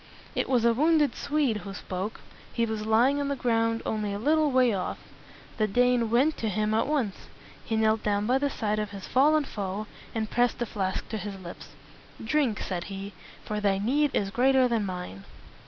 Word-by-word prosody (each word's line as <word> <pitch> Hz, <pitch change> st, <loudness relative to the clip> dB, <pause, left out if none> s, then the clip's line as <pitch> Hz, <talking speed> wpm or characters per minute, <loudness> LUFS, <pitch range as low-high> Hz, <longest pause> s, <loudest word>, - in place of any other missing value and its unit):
It -, -, -1 dB
was 245 Hz, -3 st, +3 dB
a 235 Hz, -, +5 dB
wounded 300 Hz, +3 st, +3 dB
Swede 285 Hz, -6 st, 0 dB
who 195 Hz, -1 st, -8 dB
spoke. 195 Hz, +2 st, -5 dB, 0.3 s
He 230 Hz, -, 0 dB
was 220 Hz, -1 st, -4 dB
lying 245 Hz, +6 st, +4 dB
on 285 Hz, -, -1 dB
the 280 Hz, -, -1 dB
ground 230 Hz, -2 st, 0 dB
only 215 Hz, -2 st, -1 dB
a -, -, -2 dB
little 305 Hz, +7 st, +2 dB
way 255 Hz, -3 st, +3 dB
off. 185 Hz, -2 st, -3 dB, 0.6 s
The 215 Hz, -2 st, +2 dB
Dane 245 Hz, +1 st, +2 dB
went 265 Hz, +7 st, +3 dB
to 225 Hz, -, -1 dB
him 215 Hz, +2 st, 0 dB
at 225 Hz, -, +2 dB
once. 265 Hz, -10 st, -2 dB, 0.4 s
He 225 Hz, -, -2 dB
knelt 220 Hz, 0 st, +2 dB
down 205 Hz, 0 st, 0 dB
by 255 Hz, +4 st, +2 dB
the 285 Hz, +1 st, +1 dB
side 215 Hz, -4 st, -1 dB
of 210 Hz, -1 st, -2 dB
his 200 Hz, -2 st, -8 dB
fallen 300 Hz, +4 st, +4 dB
foe, 205 Hz, -4 st, -4 dB, 0.3 s
and 220 Hz, -1 st, -1 dB
pressed 245 Hz, +2 st, +1 dB
the 240 Hz, -, -1 dB
flask 190 Hz, -3 st, -3 dB
to 220 Hz, -, -3 dB
his 200 Hz, -1 st, -6 dB
lips. 170 Hz, -5 st, -10 dB, 0.5 s
"Drink," 240 Hz, -2 st, +1 dB
said 175 Hz, -3 st, -3 dB
he, 195 Hz, 0 st, -7 dB, 0.3 s
"for 210 Hz, 0 st, -2 dB
thy 200 Hz, -2 st, +2 dB
need 275 Hz, +9 st, +2 dB
is 195 Hz, -1 st, 0 dB
greater 255 Hz, +3 st, +4 dB
than 225 Hz, -4 st, 0 dB
mine." 180 Hz, -, -6 dB
220 Hz, 200 wpm, -27 LUFS, 205-255 Hz, 0.6 s, a